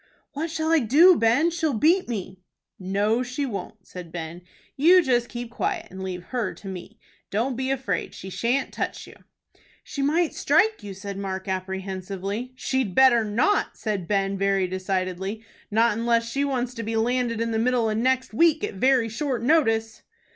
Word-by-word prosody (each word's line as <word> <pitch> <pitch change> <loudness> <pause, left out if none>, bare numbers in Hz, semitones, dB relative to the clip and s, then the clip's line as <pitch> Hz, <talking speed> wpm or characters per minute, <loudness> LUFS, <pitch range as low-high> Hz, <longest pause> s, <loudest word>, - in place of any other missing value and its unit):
"What 315 +3 -3
shall 315 0 -1
I 330 - +5
do, 305 - +6
Ben? 250 +8 +3
She'll 320 -5 -1
beat 340 - +3
me." 190 -4 -5 0.4
"No, 200 +5 0
she 255 +3 -3
won't," 200 -3 -7
said 180 -2 -10
Ben. 170 0 -6 0.3
"You 350 +6 +6
just 245 -4 +1
keep 240 -1 -6
quiet, 350 +5 -3
and 190 - -8
leave 185 -2 -5
her 240 -6 -2
to 200 - -12
me. 190 +3 -8 0.3
Don't 240 +6 -1
be 260 +2 -2
afraid. 265 -1 -2
She 190 - -8
shan't 245 +8 -1
touch - - -4
you." - - -13 0.7
"She 280 - -5
might 315 +4 +1
strike 410 +10 +2
you," 200 -2 -8
said 195 +1 -6
Mark, 190 -1 -4
apprehensively. 190 +4 -4
"She'd 255 -6 -1
better 260 -3 +6
not!" 230 - +1
said 205 -6 -3
Ben, 195 -1 0
very 195 -1 +2
decidedly; 185 +3 -3 0.2
"not 225 +1 +3
unless 230 0 +1
she 275 +4 -1
wants 255 -3 -1
to 230 - -5
be 225 0 -3
landed 235 0 0
in 230 0 -1
the 220 - 0
middle 240 -1 +2
of 215 - 0
next 255 +2 0
week 320 +5 +3
at - - -2
very 255 +3 +3
short 240 +1 -3
notice." 225 -6 +2
230 Hz, 175 wpm, -25 LUFS, 195-265 Hz, 0.7 s, do